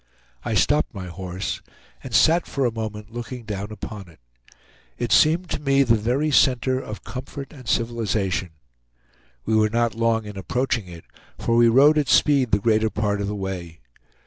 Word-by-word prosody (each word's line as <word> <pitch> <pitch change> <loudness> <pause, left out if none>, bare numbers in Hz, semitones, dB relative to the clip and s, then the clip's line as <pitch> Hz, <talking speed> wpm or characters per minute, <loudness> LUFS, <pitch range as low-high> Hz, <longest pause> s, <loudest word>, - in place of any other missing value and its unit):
I - - -2
stopped - - +2
my 95 -2 -6
horse, 90 +1 -5 0.4
and 130 - -8
sat 160 +9 +4
for 140 -2 -1
a 120 - +1
moment 110 -1 -6
looking 120 +1 -7
down 105 -1 -5
upon 105 -3 -8
it. 80 - -20 0.8
It 120 - -3
seemed 165 +4 +4
to - - -1
me 140 -1 +3
the 120 -3 +3
very 125 +8 0
center 130 -1 +3
of 105 -6 -8
comfort 135 +2 -8
and 130 -5 -13
civilization. 110 -5 -1 1.0
We 110 - +1
were 110 0 +3
not 115 +1 0
long 115 -1 0
in 105 -1 -8
approaching 120 -1 -1
it, 85 -2 -11 0.3
for 115 - 0
we 120 0 +6
rode 140 +6 +5
at 145 - -1
speed 140 -5 +4
the 100 - +3
greater 110 +1 +2
part 105 -1 -1
of 100 - -2
the 105 - -3
way. 90 -4 -6
115 Hz, 175 wpm, -23 LUFS, 105-130 Hz, 1.0 s, we